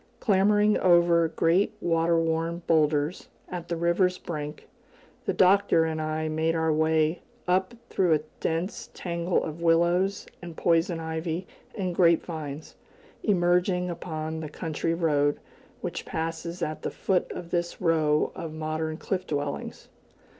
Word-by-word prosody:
Clambering 210 0 +3
over 170 -2 +5
great 175 +6 +2
water 165 0 +2
worn 165 +1 -1
boulders, 155 0 +1 0.2
at 175 -2 -6
the 170 - -2
river's 170 +2 +2
brink, 150 -4 -6 0.6
the - - +1
Doctor 190 -3 +4
and 160 -1 -2
I 155 0 -2
made 160 +1 0
our 160 -1 +2
way 160 +1 +2 0.3
up 185 +5 +1 0.2
through 175 -4 +3
a 150 - -1 0.2
dense 165 +4 -2
tangle 170 0 -1
of 160 +2 -6
willows 170 +4 +2 0.2
and 170 -2 -9
poison 170 0 +2
ivy 160 +2 -3 0.3
and 185 -4 -2
grape 170 -2 +4
vines, 155 -3 -6 0.5
emerging 180 -2 +2
upon 160 -2 -4
the 155 -1 -5
country 165 +1 -2
road 145 -4 +1 0.4
which - - -4
passes 165 +2 -4
at 155 - -3
the - - -2
foot 190 -2 0
of 170 -1 -7
this 175 -1 -1
row 155 -3 +2
of 160 -2 -6
modern 155 0 -3
cliff 185 +1 -3
dwellings. 145 -1 -4
165 Hz, 140 wpm, -27 LUFS, 160-180 Hz, 0.6 s, over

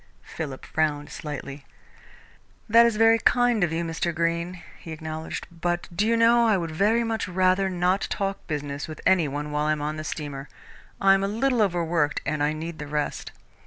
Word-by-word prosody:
Philip 140 -5 -7
frowned 150 -2 -1
slightly. 140 -2 -7 1.0
"That 230 +1 +7
is 230 - 0
very 225 +1 +5
kind 245 -4 +3
of 170 - +1
you, 165 +1 -1
Mr. 165 +1 -2
Greene," 170 +2 -1 0.2
he 165 - -9
acknowledged, 160 0 -6
"but 175 +1 -2
do 210 +4 +1
you 230 0 +3
know 235 +1 +5
I 215 -3 +4
would 165 -3 -3
very 210 +8 +2
much 225 -3 -2
rather 185 +1 +2
not 180 +1 0
talk 195 -1 -3
business 145 -2 -4
with 155 - -8
any 175 -5 +4
one 145 +2 -4
while 150 +1 0
I 155 - +3
am 150 - -4
on 155 +1 -3
the 155 - -5
steamer? 145 -3 -6 0.5
I 195 0 +6
am 195 0 +2
a - - +1
little 235 +3 +1
overworked 170 -6 +1
and 150 +1 -1
I 145 +1 +2
need 160 +1 -6
the 150 - -6
rest." 150 0 -3
170 Hz, 195 wpm, -25 LUFS, 150-200 Hz, 1.0 s, That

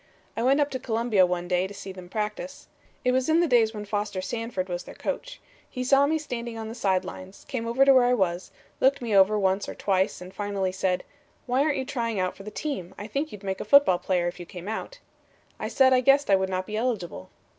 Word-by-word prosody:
"I - - -2
went 270 +4 +3
up 290 0 +1
to 260 - -3
Columbia 225 -6 +2
one 175 0 -2
day 180 +1 +1
to 200 - -11
see 195 - -7
them 185 -1 -11
practice. 215 +7 -4 0.4
It 250 - +4
was 260 +3 +1
in 320 +1 +4
the 345 - +3
days 235 -5 +4
when 210 -2 -7
Foster 205 -1 -2
Sanford 225 -1 -3
was 175 -1 -3
their - - -11
coach. - - -4 0.3
He 255 - -4
saw 275 +2 +4
me 315 +2 +1
standing 240 -6 -5
on 220 -1 -5
the - - -6
side 190 -5 0
lines; 185 +1 -10
came 235 -4 -3
over 255 +4 +3
to 275 - +7
where 255 -2 +6
I 250 0 +3
was; 180 -4 -1 0.3
looked 270 0 +3
me 225 -4 0
over 195 +2 +5
once 195 0 +1
or - - -6
twice 190 0 0
and 180 +1 -10
finally 200 -2 -2
said: 185 -1 -1 0.4
"'Why 255 +2 +1
aren't 295 0 +1
you 265 - -2
trying 230 -9 -1
for - - -14
the 205 - -7
team? 210 - -5
I 205 - -6
think 280 +8 -3
you'd 205 -1 -10
make 190 -1 -3
a - - -2
football 210 -6 +5
player 180 -2 0
if 175 - -5
you 175 - -7
came 180 +1 -9
out.' 220 - -5 0.6
"I - - -3
said 265 -2 +4
I 255 - +4
guessed 275 -2 +4
I - - +7
would 190 0 0
not 185 0 -2
be 215 - -5
eligible. 210 - -3
215 Hz, 245 wpm, -26 LUFS, 190-255 Hz, 0.6 s, to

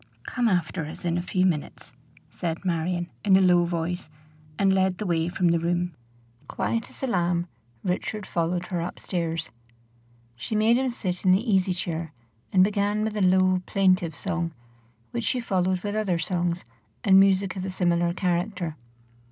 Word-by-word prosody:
"Come 245 -2 0
after 170 -3 -1
us 155 - -8
in 170 -1 +1
a - - -1
few 185 +1 +1
minutes," 150 -5 -2 0.3
said 165 +3 -4
Marion, 175 0 -1
in 195 -2 +6
a - - +4
low 180 -2 +5
voice, 170 0 -3 0.5
and 195 -1 +3
led 190 -1 +2
the 215 - -4
way 170 -2 +1
from 180 -1 +1
the 170 0 +3
room. 175 +1 -1 0.5
Quiet 230 0 -2
as - - -11
a - - +3
lamb 175 -6 0 0.4
Richard 190 +3 -2
followed 175 +1 -1
her 175 -2 -1
up 170 - -5
stairs. 165 -2 -3 0.8
She 125 - -4
made 220 +2 +4
him 260 0 +1
sit 185 -7 -3
in 185 - +5
the 210 +7 +1
easy 190 -1 +3
chair, 165 -3 -3 0.4
and 185 -1 +6
began 205 +1 +1
with 215 -1 -2
a 210 - -1
low, 185 0 +4
plaintive 185 -5 +2
song, 170 -3 -2 0.6
which 115 - -3
she 255 - +1
followed 185 -5 0
with 205 -1 -2
other 210 -5 0
songs 175 0 -1 0.4
and 190 -2 +7
music 195 0 +3
of 185 - -4
a 190 - -3
similar 175 -2 +1
character. 175 -2 -1
180 Hz, 175 wpm, -26 LUFS, 170-195 Hz, 0.8 s, and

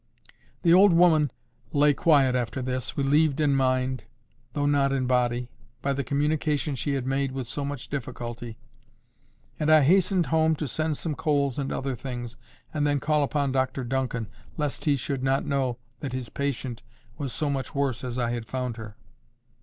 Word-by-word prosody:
The 170 -2 +6
old 190 +1 +7
woman 165 -4 +5 0.4
lay 145 0 +5
quiet 140 -4 +4
after 120 0 -1
this, 130 -1 -3
relieved 145 +1 +3
in 145 -2 +3
mind, 130 -1 +1 0.5
though 145 -1 0
not 140 -1 +3
in 135 -2 0
body, 125 -1 +1 0.3
by 140 - +1
the 140 0 -2
communication 150 +1 0
she 135 +3 -1
had 130 -2 -2
made 135 0 0
with 130 -2 -3
so 145 +4 -3
much 140 -2 -5
difficulty, 120 -3 -5 1.0
and 150 - +1
I 155 -1 +7
hastened 185 +3 +4
home 160 0 +4
to 150 -1 -3
send 155 +2 -1
some 160 - -3
coals 140 -3 0
and 135 -1 -2
other 135 -1 -2
things, 120 -1 -6 0.4
and 150 -1 +1
then 145 -1 +1
call 150 +2 +1
upon 140 -1 0
Dr 130 0 0
Duncan, 125 -2 -2 0.3
lest 150 -3 -2
he 145 -2 +4
should 135 0 -3
not 135 +1 +1
know 135 -4 0 0.2
that 135 -3 -5
his 130 -3 -4
patient 130 -3 -3 0.4
was 140 -3 -3
so 145 +4 -1
much 135 0 -4
worse 135 -4 0
as 125 -1 -4
I 120 -2 0
had 120 -2 -4
found 125 -2 -3
her. 110 -1 -9
135 Hz, 175 wpm, -26 LUFS, 125-145 Hz, 1.0 s, old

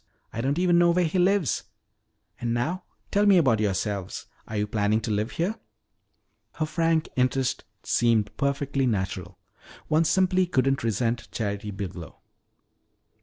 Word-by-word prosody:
I 115 - -3
don't 140 +4 0
even 175 -1 +4
know 175 0 +5
where 175 +1 +3
he 165 +3 0
lives. 180 - +2 0.7
And 120 -1 -1
now, 160 +11 -2 0.3
tell 205 +1 +3
me 195 -2 +7
about 130 -10 +3
yourselves. 100 -2 -2 0.2
Are 110 - -4
you 105 - +1
planning 105 0 +1
to 110 - -3
live 105 +3 -1
here?" 195 +7 -2 0.9
Her 155 - -1
frank 165 0 +1
interest 130 0 0 0.2
seemed 115 -4 +1
perfectly 140 -1 0
natural. 95 -5 -3 0.5
One 160 +2 +3
simply 185 +2 +2
couldn't 135 -5 +1
resent 115 +2 -1
Charity 100 -2 -3
Biglow. 95 -5 -7
130 Hz, 140 wpm, -26 LUFS, 105-170 Hz, 0.9 s, me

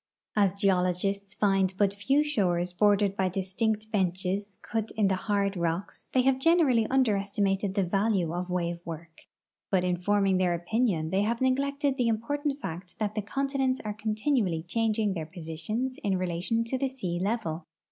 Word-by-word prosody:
As 200 -3 +3
geologists 195 +1 0
find 195 -2 +2
but 200 -1 +2
few 270 +9 +2
shores 180 -11 0
bordered 205 0 +3
b}" 190 -2 +1
distinct 210 +4 -2
benches 190 0 -1
cut 225 -1 -2
in 205 -3 +3
the - - +2
hard 200 0 0
rocks, 170 +1 -3
the.y 255 -1 +2
have 265 -1 +3
generally 270 -8 +4
underestimated 200 -5 +1
the 200 - +2
value 195 -2 +1
of 180 +1 -3
wave 175 -1 -1
work, 165 -1 -9 0.4
but 185 -2 +2
in 180 -1 +1
forming 195 +1 +2
their 180 -2 +2
opinion 175 -3 0
they 195 - +2
have 230 +3 0
neglected 275 +1 +1
the 245 -3 +2
important 280 +6 -1
fact 175 - -7
that 210 -1 -1
the 215 - -1
continents 270 +3 -1
are 210 - -2
continually 215 - 0
changing 215 +2 0
their 160 -4 -4
positions 175 +10 -4
in 195 -3 +1
relation 185 +6 -1
to 255 +3 -2
the 270 0 0
sea 185 -10 -3
level. 190 -6 -2
200 Hz, 165 wpm, -28 LUFS, 180-230 Hz, 0.4 s, generally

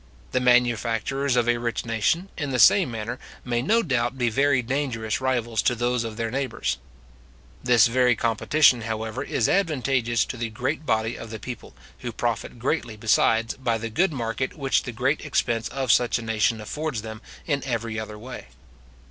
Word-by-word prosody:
The - - +1
manufacturers 125 +2 +2
of 120 -1 +2
a 120 0 +3
rich 120 -1 -2
nation, 115 - 0
in 145 -4 -3
the 130 - -1
same 165 - +6
manner, 115 +2 -5 0.3
may 120 -1 0
no 225 - +2
doubt 125 -3 0
be 120 -2 +1
very 135 +1 +2
dangerous 120 -4 -2
rivals 120 -4 0
to 125 - +2
those 120 0 0
of 110 -1 -6
their 115 -1 -2
neighbours. 135 - -2 0.8
This 120 -4 +5
very 125 0 +3
competition, 120 +4 +3
however, 110 +2 -4
is - - 0
advantageous 130 - +1
to 125 - -6
the 115 0 -3
great 130 +7 -3
body 110 0 +1
of 115 - -8
the 110 - -6
people, 120 +3 -8 0.2
who 120 - -5
profit 115 0 -3
greatly, 120 -3 -2
besides, 115 +1 +2
by 120 -4 0
the 115 0 -5
good 175 - +2
market 125 -1 -3
which 135 -2 +1
the 125 - -6
great 130 +5 0
expense 120 -6 0
of 135 -3 0
such 120 -1 +3
a 115 - -6
nation 110 0 +1
affords 130 +1 -4
them 110 -1 -8 0.2
in 145 -4 -1
every 115 -3 -2
other 105 -1 -6
way. 120 - -9
120 Hz, 180 wpm, -25 LUFS, 115-130 Hz, 0.8 s, same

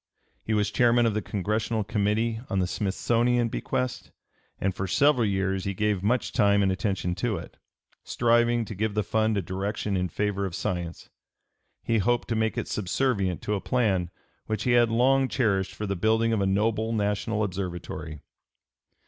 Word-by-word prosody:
He 110 - -1
was 105 -1 +1
Chairman 120 -1 +4
of 115 - +2
the 110 - -1
Congressional 110 +3 -1
Committee 110 +2 0
on 95 - -1
the 95 - +2
Smithsonian 115 +5 +1
bequest, 125 +2 -3 0.5
and 95 0 0
for 95 +1 -3
several 135 +1 +3
years 95 -1 -1
he 100 -1 -2
gave 105 -1 0
much 115 +5 0
time 100 0 +3
and 95 - +2
attention 95 -2 -1
to 110 +3 -1
it, - - -9 0.5
striving 120 0 +2
to 110 - -7
give 105 +1 -2
the 105 - +1
fund 110 +1 +1
a 100 - -1
direction 100 +3 -3
in 90 -1 0
favor 105 0 -1
of 95 -3 -3
science; 85 -2 -4 0.7
he 115 - +1
(p. - - +2
304) 105 +5 +2
hoped 120 - -1
to 115 - 0
make 110 0 0
it - - -2
subservient 100 -3 -1
to 105 - -1
a 100 - -1
plan 100 -8 +1 0.4
which 110 -1 -2
he 125 - +1
had 120 -1 +5
long 130 +4 +3
cherished 100 -7 0
for 105 - -4
the 100 -1 -2
building 110 +4 +2
of 105 - +1
a 95 - +1
noble 110 +3 +1
national 105 +1 0
observatory. 90 -5 -5
105 Hz, 180 wpm, -26 LUFS, 95-115 Hz, 0.7 s, had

